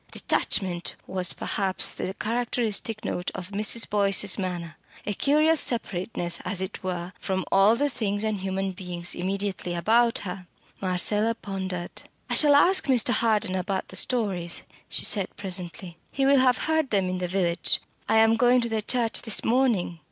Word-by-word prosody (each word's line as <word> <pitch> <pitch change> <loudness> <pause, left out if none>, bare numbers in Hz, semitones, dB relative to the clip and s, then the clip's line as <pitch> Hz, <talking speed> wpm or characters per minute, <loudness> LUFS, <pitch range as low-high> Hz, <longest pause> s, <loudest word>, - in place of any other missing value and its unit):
Detachment 180 -3 0
was 185 -2 -2
perhaps 190 -2 0
the 190 - -5
characteristic 225 -1 -2
note 180 - -3
of 185 +2 -7
Mrs. 215 +3 +1
Boyce's 200 -1 +3
manner, 175 -3 -4 0.3
a 210 - -2
curious 305 +7 +3
separateness, 180 -6 -1
as 200 - -2
it 190 +2 -5
were, 180 0 -4
from 190 -2 -3
all 195 +3 +5
the 290 +4 +1
things 215 -6 -2
and 215 -2 -1
human 190 0 -3
beings 180 -2 -3
immediately 190 -1 -3
about 230 +7 +2
her. 180 0 -7 0.3
Marcella 205 +4 +1
pondered. 190 -4 -6 0.3
"I - - +2
shall 295 -2 +6
ask 365 +6 +4
Mr. 255 -4 +2
Harden 215 -5 +1
about 190 +1 -3
the - - -3
stories," 190 -6 0 0.3
she - - +4
said 200 -3 +3
presently. 180 -2 -4
"He 275 - 0
will 275 0 +5
have 255 -1 +3
heard 315 -3 0
them 195 -3 +1
in 185 0 -3
the 180 - -2
village. 175 -2 +1 0.3
I 220 - +3
am 225 0 +4
going 245 +1 +4
to 235 - -2
the 220 -1 -1
church 230 0 +1
this 220 -3 +1
morning." 225 -9 +1
200 Hz, 165 wpm, -25 LUFS, 185-230 Hz, 0.3 s, shall